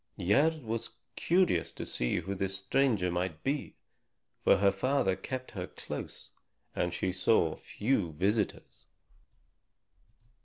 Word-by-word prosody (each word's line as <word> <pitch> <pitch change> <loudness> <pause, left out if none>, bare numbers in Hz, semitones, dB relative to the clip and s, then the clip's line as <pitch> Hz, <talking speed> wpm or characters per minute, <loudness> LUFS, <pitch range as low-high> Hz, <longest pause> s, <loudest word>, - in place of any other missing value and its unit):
Gerd 145 - +2
was 115 0 -4 0.2
curious 180 +1 +2
to - - -6
see - - -1
who 100 - -4
this 95 0 -2
stranger 100 -3 +1
might 90 -2 -2
be; 140 +1 -2 0.7
for - - +6
her 100 +1 +4
father 100 -1 +1
kept 130 +4 -5
her 90 -5 -5
close - - -8 0.4
and 90 - 0
she 90 +2 -1
saw 90 -3 +2
few 105 -7 -1
visitors. 100 +7 -1
100 Hz, 120 wpm, -31 LUFS, 90-130 Hz, 0.7 s, for